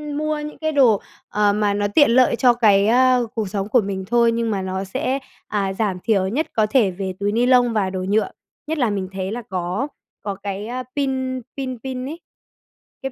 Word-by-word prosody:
mua 305 0 -1
những 300 0 -7
cái 315 0 -1
đồ, 250 -8 +4 0.3
ờ, 210 -1 +2
mà 205 -1 +1
nó 205 0 0
tiện 290 -6 +6
lợi 255 0 +4
cho 245 0 +4
cái, 205 -4 +4
ơ, 250 0 +4
cuộc 215 -4 -2
sống 195 0 -2
của 240 +1 +4
mình 195 -1 -4
thôi 235 0 +3
nhưng 230 -1 -1
mà 195 - -1
nó 190 0 -3
sẽ, 255 +7 -2 0.3
à, 195 -2 -1
giảm 195 -3 -1
thiểu 195 -4 +2
nhất 275 +11 -1
có 215 -1 +3
thể 220 -6 +3
về 190 +1 -4
túi 205 +1 0
ni 235 +3 +2
lông 245 -2 +4
và 200 -3 +1
đồ 185 0 -4
nhựa. 215 +2 +1 0.4
Nhất 320 - -2
là 245 -6 +2
mình 195 -2 -3
thấy 190 +1 -4
là 240 - -4
có 185 +8 -2 0.3
có 200 -1 -4
cái, 200 +1 -5
a, 255 +1 -4
pin 260 -2 -1 0.2
pin 255 -2 -4
pin 255 -1 -4
ấy, 315 +5 -6 0.8
cái 270 - -3
220 Hz, 220 wpm, -21 LUFS, 195-255 Hz, 0.8 s, tiện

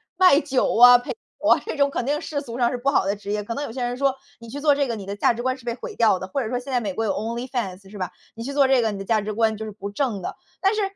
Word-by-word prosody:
卖 365 -5 +6
酒 270 -5 0
啊， 245 +1 +10
陪 245 - -6
酒 445 - -5
啊， - - +5
这 - - -4
种 280 0 +3
肯 250 - -3
定 295 +2 0
世 290 -3 -3
俗 240 -3 -7
上 240 -1 +3
是 250 - -2
不 275 +3 0
好 265 - +2
的 200 - +1
职 205 0 -6
业。 210 0 -1
可 230 - -4
能 285 - -3
有 - - -7
些 250 0 -4
人 245 +1 -2
说 275 -1 +1 0.2
你 230 - -12
去 285 - -6
做 295 -2 +5
这 280 -2 +1
个， 230 - -2
你 200 -3 -7
的 200 +1 -5
价 235 - +3
值 240 +1 -5
观 260 +1 0
是 250 - -17
被 235 - -1
毁 - - -8
掉 220 -5 +4
的。 185 - -6
或 275 - -1
者 220 - -3
说 250 - -1
现 270 +2 -8
在 250 - +2
美 200 -5 -3
国 225 - -2
有 200 - +1
onlyfans 225 -4 -4
是 210 - -9
吧。 185 -2 -3 0.2
你 230 - -6
去 280 - -4
做 280 -1 +4
这 265 -2 +4
个， 220 -2 0
你 - - -5
的 - - -4
价 220 +1 +2
值 210 +1 -4
观 220 0 +1
就 220 - -5
是 215 - -6
不 200 0 -7
正 210 -3 -2
的。 - - -5 0.3
但 390 +2 +3
是 430 - 0
240 Hz, 410 characters per minute, -23 LUFS, 215-275 Hz, 0.3 s, 啊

